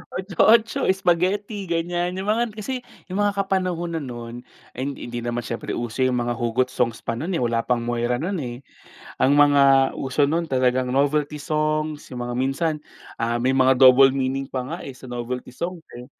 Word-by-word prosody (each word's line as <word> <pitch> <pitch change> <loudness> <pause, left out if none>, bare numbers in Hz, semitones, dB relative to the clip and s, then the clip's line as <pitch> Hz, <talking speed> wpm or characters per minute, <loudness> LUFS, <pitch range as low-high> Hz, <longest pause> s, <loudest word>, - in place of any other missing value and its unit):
Otso-otso, 215 +5 +3
spaghetti 190 +3 0
ganyan, 175 +1 -1
yung 190 - -4
mga 235 +2 +1
'yan, - - -10
kasi 220 +5 -4 0.4
yung 190 - -2
mga 205 -1 +1
kapanahunan 175 -4 -1
nun, 120 -2 -7 0.4
ay 130 +3 -3
hindi 140 - -8
hindi 120 0 -4
naman 120 0 -2
siyempre 115 - -4
uso 120 +1 -4
yung 125 - 0
mga 120 0 -1
hugot 125 +2 0
songs 120 -3 -1
pa - - -2
nun 175 +3 -2
eh - - -1
wala 115 -1 +1
pang 125 -2 0
Moira 120 0 0
nun, 180 +5 -2
eh. 120 0 -7 0.6
Ang 135 - +4
mga 140 -2 +5
uso 135 +2 +1
nun 170 +2 0
talagang 130 -1 +1
novelty 145 +2 +1
songs, 155 0 -1
yung 125 - -5
mga 120 - -4
minsan 135 +5 0 0.5
ah, 115 +1 0
may 130 +2 +2
mga 130 0 +4
double 130 +1 +8
meaning 135 0 -1
pa 130 - -2
nga - - -4
eh, 135 - -7
sa 130 - -13
novelty 125 +1 -5
song 175 0 -4 0.2
eh, 125 - -9
135 Hz, 190 wpm, -23 LUFS, 125-170 Hz, 0.6 s, double